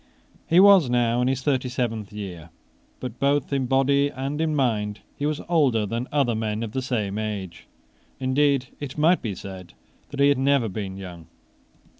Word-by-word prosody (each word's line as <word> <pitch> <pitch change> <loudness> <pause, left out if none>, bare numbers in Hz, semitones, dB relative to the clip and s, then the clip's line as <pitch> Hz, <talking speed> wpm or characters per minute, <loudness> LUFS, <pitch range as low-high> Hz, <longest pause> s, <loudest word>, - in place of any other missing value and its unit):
He 170 - +5
was 195 -8 +7
now 120 0 +2
in 125 - +1
his 130 0 -1
thirty 130 -3 0
seventh 115 -5 -3
year. 90 -6 -8 0.5
But 125 -2 -7
both 140 0 +1
in 135 -2 0
body 140 +2 +3
and 140 +3 -4
in 160 -1 0
mind 105 -6 0
he 145 - -2
was 150 -1 -2
older 140 -11 +2
than 115 +5 -3
other 140 -5 +2
men 110 0 -2
of 110 - -5
the 130 - -2
same 110 -6 -2
age. 100 -5 -5 0.5
Indeed 135 0 +1
it 145 -1 -7
might 165 +4 +3
be 105 -5 -4
said 95 -2 -10 0.3
that 140 - -8
he 140 0 +5
had 140 -2 +2
never 135 -3 +2
been 95 -1 -5
young. 90 -4 -9
125 Hz, 180 wpm, -24 LUFS, 105-140 Hz, 0.5 s, was